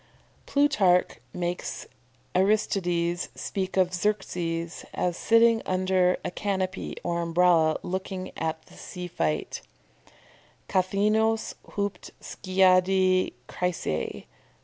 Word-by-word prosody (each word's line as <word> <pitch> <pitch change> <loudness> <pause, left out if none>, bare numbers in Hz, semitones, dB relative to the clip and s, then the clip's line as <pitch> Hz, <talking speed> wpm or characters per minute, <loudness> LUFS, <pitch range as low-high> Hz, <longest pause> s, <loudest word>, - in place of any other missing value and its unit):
"] - - -34
Plutarch 200 - +3
makes 175 +2 -4 0.5
Aristides 180 -3 +1
speak 190 -1 -4
of 185 -1 +3
Xerxes 175 -4 -2
as 175 -1 0
sitting 230 +2 +4
under 185 -1 +2
a - - -2
canopy 190 -1 -3
or 170 -1 -1
Umbrella 170 -2 +3
looking 185 0 -4
at 160 0 -3
the - - -19
sea 180 -1 -8
fight 80 - -2 1.1
"_kathaeenos 215 +4 +1 0.2
hupd 200 -2 -3
skiadi 185 0 +2
chrysae. 175 - -3
185 Hz, 95 wpm, -26 LUFS, 175-195 Hz, 1.1 s, sitting